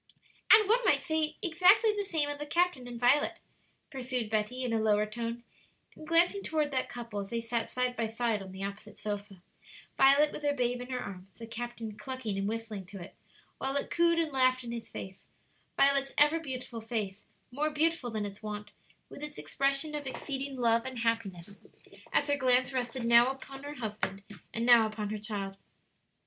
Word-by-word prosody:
"And 430 -1 +8
one 475 +4 +3
might - - +3
say 315 -1 0
exactly 370 +5 +5
the 410 - -1
same 320 -7 0
of 290 0 -4
the 295 - -5
captain 340 -5 +1
and 240 -1 -7
Violet," 250 +5 +3 0.5
pursued 250 -5 -3
Betty, 220 +4 -1
in 245 -2 -1
a 225 - +2
lower 210 -1 +3
tone, 230 +2 -5 0.5
and 310 - -11
glancing 345 +4 +4
toward 310 -5 0
that 260 -1 -1
couple, 235 -4 -6
as 195 -1 -5
they 235 - -1
sat 230 0 -2
side 250 0 0
by 230 -2 -1
side 225 -1 -1
on 190 -1 -9
the 190 +1 -7
opposite 200 +1 -7
sofa 205 -3 -6 0.5
Violet 280 +3 +6
with - - -7
her 290 -1 +1
babe 245 -1 0
in 250 - -8
her 255 -1 -2
arms, 190 -6 -7
the 230 - -8
captain 230 -2 -6
clucking 260 -6 -4
and 195 +1 -1
whistling 220 -3 -4
to 195 +1 -9
it, 175 - -10 0.5
while 270 +1 -2
it 280 - -1
cooed 335 0 +3
and 325 -2 +1
laughed 255 -1 +3
in 235 - -6
his 235 -1 -6
face 190 0 -9 0.5
Violet's 275 0 +3
ever 295 +3 +5
beautiful 255 -6 -6
face 215 -3 -4 0.2
more 295 +4 0
beautiful 310 -3 +1
than 215 -2 -2
its 200 0 -8
wont, 210 -1 -6 0.4
with - - -11
its 300 0 -6
expression 275 +3 0
of 295 -2 -4
exceeding 275 +1 -4
love 230 -1 +3
and 260 -1 -6
happiness 200 -5 -2 0.5
as 290 - +3
her 285 -1 +1
glance 255 -1 +2
rested 245 -1 -2
now 235 +2 +7
upon 270 0 -8
her 290 +1 -7
husband 210 -4 -4 0.3
and 230 +1 -2
now 235 -2 +7
upon 215 -1 -4
her 215 - -3
child. 200 -2 -5
245 Hz, 195 wpm, -31 LUFS, 215-285 Hz, 0.5 s, And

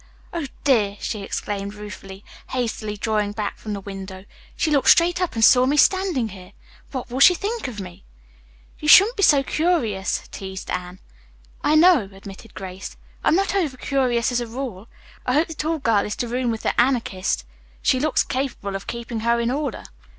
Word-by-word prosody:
Oh 335 -5 -3 0.2
dear!" 215 -7 +2
she 215 - -4
exclaimed 200 0 -4
ruefully, 200 -1 -10 0.2
hastily 225 -4 -3
drawing 210 -1 -1
back 210 -1 -4
from 215 - -5
the 200 - -4
window, 190 -1 -8 0.3
"she 315 - 0
looked 280 -2 +3
straight 350 +1 +5
up 360 -8 -1
and 225 -1 +5
saw 255 0 +6
me 290 +2 +1
standing 360 - +3
here. 185 -2 -12 0.4
What 255 -3 -6
will 255 - -3
she 355 +6 +8
think 425 - -3
of 230 -5 -7
me?" 180 -2 -9 0.8
"You 300 - -5
shouldn't 405 +10 +8
be 400 - -2
so 285 -7 +5
curious," 270 - 0
teased 190 -1 -7
Anne. 180 0 -4 0.7
"I 300 - +3
know 345 0 +7
it," 195 -1 -11
admitted 195 +2 -12
Grace. 190 0 -8 0.3
"I'm - - +4
not 390 +1 +1
over 320 -10 0
curious 250 -3 0
as 245 0 0
a 240 - -4
rule. 230 -4 -6 0.4
I 250 - +2
hope 310 +5 +2
the - - -5
tall 320 +1 -2
girl 230 -8 +2
is 210 - -4
to 240 - -3
room 245 +1 -1
with 225 -1 -3
the - - +2
Anarchist. 235 -7 0 0.4
She 260 - +3
looks 305 +2 +2
capable 255 -7 -3
of 195 - -6
keeping 235 -1 -5
her 235 +1 +1
in 235 +1 0
order." 280 -3 -3
235 Hz, 190 wpm, -22 LUFS, 205-290 Hz, 0.8 s, she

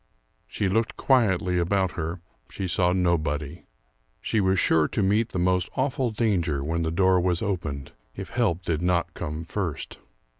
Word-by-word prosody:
She 100 - -1
looked 110 +4 0
quietly 95 -9 +2
about 95 +1 +1
her; 85 +1 -4 0.3
she 95 - -4
saw 90 0 +2
nobody. 80 -5 -1 0.5
She 110 - 0
was 95 -1 +2
sure 80 -1 +3
to 105 - -1
meet 105 +4 +2
the - - -5
most 90 0 +1
awful 130 -1 0
danger 90 -11 0
when 80 +3 -1
the 80 - 0
door 95 +2 +3
was 90 +2 0
opened, 80 -9 -3 0.2
if - - -7
help 85 +1 0
did 80 -2 -1
not 90 -1 0
come 75 +2 -5
first. 85 -4 -4
90 Hz, 160 wpm, -25 LUFS, 80-100 Hz, 0.5 s, sure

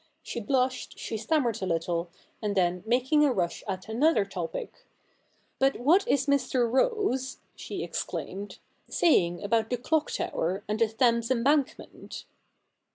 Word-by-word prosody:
She - - -4
blushed, 255 +3 -1
she - - -5
stammered 230 0 0
a 190 - -1
little, 170 0 -1 0.3
and 205 -1 -1
then, 180 -1 +2
making 260 +6 +3
a 290 - +4
rush 175 -7 -1
at 190 -1 -4
another 230 -1 +3
topic, 180 -4 -6 0.3
' - - -41
But 270 0 +2
what 340 - +4
is 275 - +2
Mr. 260 -3 +2
Rose,' 265 - 0 0.2
she - - -5
exclaimed, 200 0 -5 0.2
* - - -41
saying 175 - +2
about 220 +2 +1
the 245 - 0
Clock 310 +5 0
tower 185 +4 -2
and 210 +1 -2
the 230 - +4
Thames 230 +1 +2
Embank 265 +3 +2
ment - - -10
235 Hz, 155 wpm, -28 LUFS, 200-270 Hz, 0.3 s, a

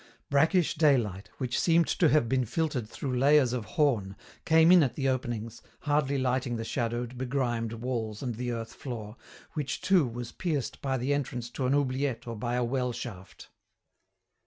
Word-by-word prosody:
Brackish 160 +4 +3
daylight, 120 - +2
which 125 -3 -1
seemed 170 -1 +4
to 165 - +3
have 145 -6 +3
been 130 +2 +1
filtered 130 -3 -2
through 130 +1 -4
layers 140 -2 +4
of 120 -4 -3
horn, 115 - 0 0.3
came 160 +1 +6
in 180 -1 +8
at 130 -6 0
the 135 -2 -1
openings, 120 -4 -3 0.2
hardly 145 -2 +1
lighting 130 -1 0
the 115 - -3
shadowed, 120 +1 -3
begrimed 120 -3 -1
walls 115 -2 -4
and 125 -2 -2
the 120 +2 -3
earth 115 -1 -5
floor, 110 -5 -7 0.4
which 145 -4 -3
too 185 -8 +3
was 120 0 -6
pierced 155 -8 -3
by 135 -1 -1
the 130 +3 0
entrance 125 -4 -3
to 130 0 -2
an 135 - +3
oubliette 135 -2 -1
or 115 -1 -5
by 120 +3 -2
a 125 - +1
well 125 +1 -1
shaft. 95 -5 -8
125 Hz, 175 wpm, -29 LUFS, 115-145 Hz, 0.4 s, in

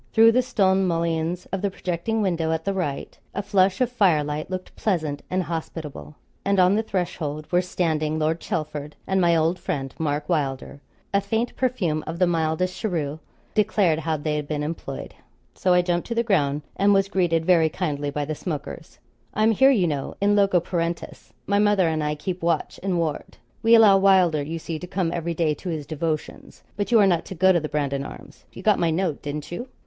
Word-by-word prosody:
Through 225 +1 +7
the 250 +2 +3
stone 195 -6 +2
mullions 165 +1 -1
of 195 0 -2
the 200 - 0
projecting 185 +4 -2
window 165 -4 0
at 160 0 -2
the 195 - 0
right, 160 -8 -3 0.2
a 200 - -2
flush 195 +1 +2
of 250 -1 +2
fire 185 -11 +3
light 150 +2 -4
looked 185 0 -6
pleasant 155 -8 -1
and 185 0 0
hospitable, 160 -2 -6 0.3
and 200 -1 +1
on 180 +1 +5
the 215 - +2
threshold 170 -7 -3
were 175 0 +4
standing 160 -4 -1
Lord 160 +1 0
Chelford 150 -2 -4
and 190 0 +1
my 170 -1 +4
old 165 +3 +1
friend 135 -8 -3
Mark 150 -1 -1
Wylder; 140 -4 -2 0.3
a 200 - +3
faint 225 +4 -2
perfume 190 -12 0
of 165 - -4
the 180 - +4
mildest 170 +2 0
cheroot 160 -8 -2 0.3
declared 200 -6 +2
how 160 0 -1
they 150 +1 -2
had 150 -1 -4
been 150 -1 -2
employed. 150 -3 -6 0.4
So 185 - 0
I 180 - +4
jumped 175 -1 -1
to 235 - -3
the 235 - +2
ground 150 -9 +1
and 200 +1 +4
was 195 0 +3
greeted 175 -4 +1
very 165 -3 +4
kindly 145 -4 -2
by 145 0 -2
the 155 - -3
smokers. 155 0 -6 0.4
'I'm 215 +1 +4
here, 265 +5 +5
you 215 -10 +3
know, 145 -4 -3
in 205 +1 +3
loco 195 -3 +4
parentis; 170 0 -4
my 200 0 +2
mother 205 -4 +3
and 160 -1 0
I 150 0 -1
keep 180 +4 -5
watch 165 -2 -1
and 190 -2 -1
ward. 160 -3 -3 0.2
We 230 +1 +6
allow 210 -4 +7
Wylder, 185 -6 +4
you 160 +3 -4
see, 160 -1 -5
to 180 - -7
come 180 -2 -1
every 170 0 -2
day 160 -2 +1
to 180 - -7
his 155 -3 -3
devotions. 155 +1 -4
But 205 +3 -3
you 230 - +6
are 205 - +6
not 175 -4 +2
to 190 - -7
go 190 +2 +5
to 175 - +3
the 155 -1 -5
Brandon 140 -2 -1
Arms - - -11
you 185 - -11
got 210 -1 +3
my 170 - +2
note, 165 -2 -1
didn't 145 +1 -5
you?' 240 +9 -5
170 Hz, 210 wpm, -24 LUFS, 155-195 Hz, 0.4 s, Through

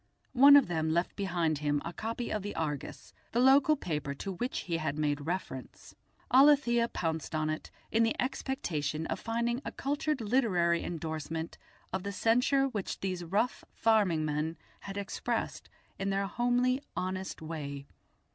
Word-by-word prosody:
One 280 +3 +9
of 285 -6 +7
them 160 -2 -1
left 170 +3 0
behind 170 -6 0
him 145 -1 +1
a 170 - -4
copy 230 +4 -4
of 215 - -1
the 205 +2 -5
Argus, 150 -3 -4 0.2
the 235 - +2
local 270 +4 +6
paper 150 - -3
to 195 +8 -5
which 240 +8 -3
he 170 -2 -2
had 155 -2 -2
made 145 -1 -1
reference. 165 -8 -5 0.4
Alethia 260 -3 +5
pounced 160 -1 -2
on 155 0 0
it, 155 - -5 0.2
in 225 - +3
the 225 0 +1
expectation 160 - -2
of - - -3
finding 235 +2 -1
a - - -4
cultured 290 +1 -1
literary 205 -8 +2
endorsement 160 0 -4 0.3
of 190 - -1
the 200 +2 -4
censure 250 +6 +3
which 215 -7 -4
these 185 -2 -2
rough 210 +8 0
farming 205 -8 +3
men 155 +2 -2 0.2
had 195 0 -7
expressed 200 -1 -3 0.3
in 195 +1 -1
their 195 0 0
homely, 245 +4 +1
honest 185 +1 -3
way. 145 -3 -6
190 Hz, 155 wpm, -31 LUFS, 160-240 Hz, 0.4 s, One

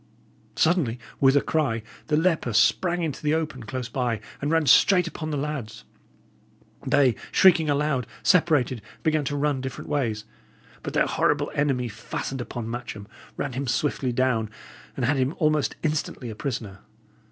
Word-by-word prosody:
Suddenly, 160 -9 +2 0.2
with 135 +1 +5
a - - +4
cry, 135 -8 0 0.2
the 150 - +2
leper 160 -8 +1
sprang 175 - +3
into 155 -4 -3
the 150 +1 +1
open 155 -5 -3
close 125 +2 -5
by, 120 -2 -1 0.2
and 145 - -1
ran 160 -1 +2
straight 180 +4 +6
upon 160 -1 -5
the 150 - -2
lads. 135 -7 -4 1.0
They, 135 -2 +4 0.2
shrieking 170 -5 +5
aloud, 145 -4 0 0.2
separated 150 -8 +3
and 105 - -21
began 155 -2 +1
to 145 - -2
run 145 -2 0
different 130 +2 -6
ways. 115 -7 -1 0.6
But - - -6
their - - +4
horrible 145 0 +1
enemy 140 -4 0
fastened 120 +4 -5
upon 120 -1 -5
Matcham, 115 -3 -6 0.3
ran - - -3
him 135 +2 -3
swiftly 130 0 0
down, 120 -3 +1 0.5
and - - 0
had 145 +1 +2
him 130 +4 0
almost 155 -3 +1
instantly 150 -6 -2
a - - -8
prisoner. 110 -6 -4
140 Hz, 160 wpm, -25 LUFS, 120-155 Hz, 1.0 s, straight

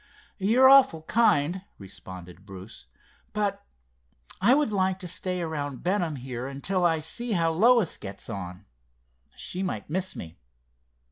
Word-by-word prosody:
"You're 230 +7 +5
awful 265 -13 +6
kind," 180 -4 +2 0.2
responded 95 -2 -11
Bruce, 95 - -11 0.5
"but 210 -2 -1 0.8
I 235 +7 +6
would 295 -5 +1
like 190 -2 +1
to 185 -1 -6
stay 180 +1 -2
around 145 -4 -4
Benham 175 -4 0
here 125 -1 -6
until 175 +7 -2
I 165 -1 +1
see 220 +10 -3
how 165 -3 +2
Lois 220 +2 +4
gets 100 -1 -7
on. 95 -2 -7 0.7
She 180 - -5
might 185 -5 -4
miss 185 +2 -1
me. 80 0 -9
165 Hz, 135 wpm, -26 LUFS, 125-195 Hz, 0.8 s, awful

